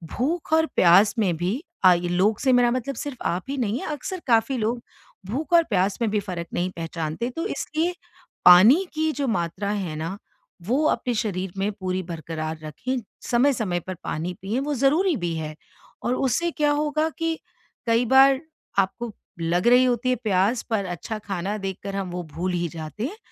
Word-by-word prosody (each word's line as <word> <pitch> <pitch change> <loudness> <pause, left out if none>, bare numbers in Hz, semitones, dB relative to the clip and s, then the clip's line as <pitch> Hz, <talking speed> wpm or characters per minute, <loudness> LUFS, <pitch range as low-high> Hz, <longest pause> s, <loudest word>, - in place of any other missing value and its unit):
भूख 315 +5 -1
और 320 0 +5
प्यास 185 +6 +6
में 190 -6 +2
भी 190 - -2 0.2
अ, 185 - +9
ये 175 0 -1
लोग 195 +5 +2
से 265 - +2
मेरा 245 -1 +5
मतलब 255 +2 -2
सिर्फ़ 285 -3 -5
आप 175 +2 0
ही 280 - -2
नहीं 235 -1 -1
है, - - -5
अक्सर 365 +6 -5
काफ़ी 230 +2 +3
लोग 235 +2 -1 0.5
भूख 290 - -3
और 340 -1 +7
प्यास 190 -1 +1
में 230 - +2
भी 210 - +1
फ़र्क 180 -4 -5
नहीं 180 +1 0
पहचानते 165 +6 -3
तो 330 - -1
इसलिए 330 -2 -2 0.5
पानी 215 - +8
की 315 0 +1
जो 280 -2 -2
मात्रा 200 -2 -1
है 190 -7 -3
ना 165 +5 -4 0.5
वो 265 +7 +2
अपने 250 - 0
शरीर 190 -5 -2
में 195 +2 0
पूरी 185 -2 -3
बरकरार 160 -1 -5
रखें। 250 - -3 0.3
समय-समय 240 -8 +1
पर 185 - -3
पानी 170 +3 -3
पिएँ 205 +6 -1
वो 295 +1 -2
ज़रूरी 305 +8 +3
भी 175 -3 -2
है। 155 -1 -5 0.5
और 240 - +1
उससे 270 +7 0
क्या 295 -2 +1
होगा 300 +2 +1
कि 330 -1 -1 0.5
कई 230 +1 +3
बार 265 +2 +6 0.4
आपको 220 +4 -1 0.3
लग 175 +5 +1
रही 250 +1 +6
होती 245 0 +1
है 255 - +3
प्यास 205 +3 +2
पर 215 -4 0
अच्छा 180 +5 -5
खाना 200 0 -3
देख 195 -2 -4
कर 195 0 -4
हम 195 -2 -3
वो 180 0 -4
भूल 180 +2 -2
ही 175 -1 0
जाते 155 +4 -6
हैं, 375 +11 -5
215 Hz, 190 wpm, -24 LUFS, 180-265 Hz, 0.5 s, अ